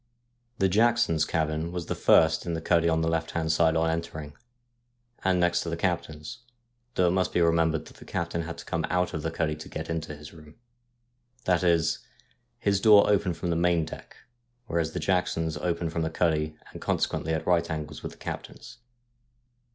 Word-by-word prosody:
The 95 - +3
Jacksons' 110 -5 +3
cabin 80 +1 -1
was 90 -1 -4
the - - -2
first - - +4
in 85 - -1
the - - -2
cuddy 85 0 +2
on 80 0 +2
the 80 - 0
left 80 0 0
hand 80 -1 +1
side 80 0 +3
on 80 0 +2
entering, 80 -2 -3 0.9
and 95 -1 +2
next 90 0 +2
to 85 - -4
the 85 - -3
captain's, 85 +3 -3 0.6
though 90 - +3
it - - +1
must 95 0 +1
be - - +1
remembered 80 -2 +2
that - - -15
the - - -13
captain 85 0 -2
had 85 0 -6
to - - -9
come 85 0 -2
out 90 0 0
of 80 - -3
the 80 - -2
cuddy 80 -2 -1
to 75 - -10
get 80 +1 -5
into 80 -2 -4
his 75 +2 -12
room. 75 -1 -15 0.9
That 90 -1 +2
is, 85 -2 +2 0.6
his 100 -1 +1
door 105 -1 +7
opened 95 -4 +1
from 85 +1 -2
the - - +1
main 85 -1 +2
deck, - - -10 0.5
whereas 85 -5 -1
the - - -2
Jacksons' 80 -4 0
opened 85 0 -2
from 85 - -1
the 80 - 0
cuddy, 80 -2 0 0.2
and - - -10
consequently 80 - -1
at 80 0 -1
right 85 -1 +2
angles 75 -1 -5
with - - -6
the - - -18
captain's. - - -8
85 Hz, 200 wpm, -27 LUFS, 80-90 Hz, 0.9 s, door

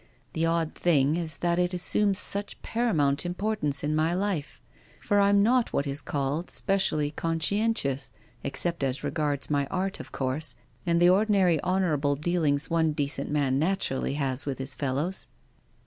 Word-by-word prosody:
The 165 +1 0
odd 165 -1 0
thing 150 -3 +2
is 165 -2 -3
that 170 0 +1
it 180 +1 0
assumes 195 +2 +2
such 200 +1 +4
paramount 155 -12 +1
importance 175 -6 -1
in 150 +1 0
my 160 +2 +1
life; 185 -7 -3 0.4
for 205 - +1
I'm 200 0 +4
not 245 +2 +2
what 140 - 0
is 140 +1 0
called 145 +5 -3
specially 155 -7 +1
conscientious, 165 - 0 0.3
except 170 -2 -2
as 135 0 -2
regards 145 -1 -2
my 140 -1 +1
art, 190 +3 -3
of - - -10
course, 135 +4 -1 0.3
and 170 0 +2
the 175 - +4
ordi 210 +4 +2
nary 185 -6 +3
honourable 160 -6 0
dealings 150 -2 0
onedecent 150 -4 0
man 140 -3 +1
naturally 155 -5 0
has 135 -1 -2
with 135 - -2
his 135 0 -5
fellows." 145 +8 -2
160 Hz, 155 wpm, -27 LUFS, 145-185 Hz, 0.4 s, such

